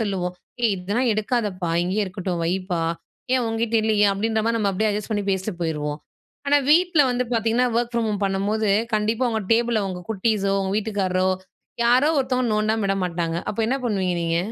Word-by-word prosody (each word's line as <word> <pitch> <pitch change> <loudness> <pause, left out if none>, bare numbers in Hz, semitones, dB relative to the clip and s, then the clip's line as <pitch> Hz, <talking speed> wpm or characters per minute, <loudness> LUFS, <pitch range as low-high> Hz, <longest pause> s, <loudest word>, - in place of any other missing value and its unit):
சொல்லுவோம். 185 -4 -2 0.3
"ஏய் 230 -3 +3
இதெல்லாம் 205 +8 -1
எடுக்காதப்பா! 210 -5 -1
இங்கேயே 195 +4 0
இருக்கட்டும். 180 -2 -3
வைப்பா, 180 -1 -1 0.5
ஏன் 255 - +2
உங்கிட்ட 225 0 -1
இல்லையா?" 210 -2 +3
அப்படின்ற 220 +2 0
மாதிரி 230 0 +1
நம்ம 205 -2 +1
அப்படியே 215 +3 +1
அட்ஜஸ்ட் 210 +1 -4
பண்ணி 205 -2 -1
பேசிட்டு 190 +1 -2
போயிருவோம். 150 -2 -2 0.5
ஆனா, 290 +1 +5
வீட்ல 345 0 +5
வந்து 250 +1 0
பார்த்தீங்கன்னா, 230 +2 +2
ஒர்க் 240 0 -2
ஃப்ராம் 230 -1 0
ஹோம் 210 -1 -2
பண்ணும்போது, 200 +2 0 0.2
கண்டிப்பா 220 +4 +1
உங்க 220 -1 -1
டேபிள்ல 235 -1 +2
உங்க 180 -1 -5
குட்டீஸோ, 200 -1 0
உங்க 190 0 -2
வீட்டுக்காரரோ 190 -4 0 0.6
யாரோ 250 +5 +4
ஒருத்தவங்க 255 -2 0
நோண்டாம 215 +1 +1
விட 195 - +1
மாட்டாங்க. 170 -2 -2
அப்ப 210 - -9
என்ன 260 - +1
பண்ணுவீங்க 190 -6 0
நீங்க? 165 0 0
210 Hz, 175 wpm, -23 LUFS, 185-230 Hz, 0.6 s, ஆனா